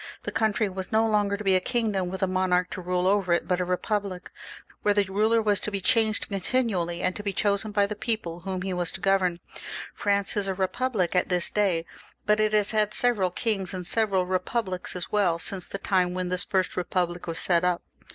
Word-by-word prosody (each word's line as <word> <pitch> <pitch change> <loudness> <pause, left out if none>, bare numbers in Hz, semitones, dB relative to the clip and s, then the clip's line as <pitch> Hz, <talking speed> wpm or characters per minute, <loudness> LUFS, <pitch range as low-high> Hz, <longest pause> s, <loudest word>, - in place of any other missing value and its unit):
The - - -4
country 220 -1 +1
was 190 -1 -6
no 220 +1 +3
longer 205 -2 +1
to 210 - -7
be 190 -2 +4
a - - +5
kingdom 210 -5 -1
with 190 +1 -4
a - - +3
monarch 180 -1 +1
to 185 - -5
rule 180 0 -1
over 190 -2 +2
it, 170 - 0
but 180 -1 +1
a 180 - 0
republic, 185 +1 -2 0.5
where 205 -1 +2
the 205 - +4
ruler 215 +4 +2
was 205 -2 +2
to - - -3
be 200 - -1
changed 220 +2 +1
continually, 195 -4 -1
and 185 - 0
to - - -5
be 205 -1 -2
chosen 205 +1 0
by 205 -1 +3
the 210 +1 -4
people 205 -7 -3
whom 185 0 -4
he 190 -1 -2
was 175 -2 -1
to - - -6
govern. 185 -2 +2 0.5
France 200 -1 0
is 205 -2 0
a 190 - -1
republic 190 0 -1
at 180 - +2
this 180 -2 +1
day; 185 -6 +1 0.4
but 210 0 +3
it 215 0 +3
has 210 -1 +3
had 215 -1 +1
several 225 -7 +2
kings 195 -1 -2
and 180 -1 -5
several 195 -3 +2
republics 185 +1 -2
as 180 - -2
well 195 -5 +2
since 185 +2 -4
the - - -5
time 180 -2 +1
when 185 -1 -2
this 180 +1 0
first 190 -2 0
republic 175 -1 -2
was 165 -1 -1
set 175 -1 +2
up. 180 -1 +1
190 Hz, 220 wpm, -26 LUFS, 180-210 Hz, 0.5 s, a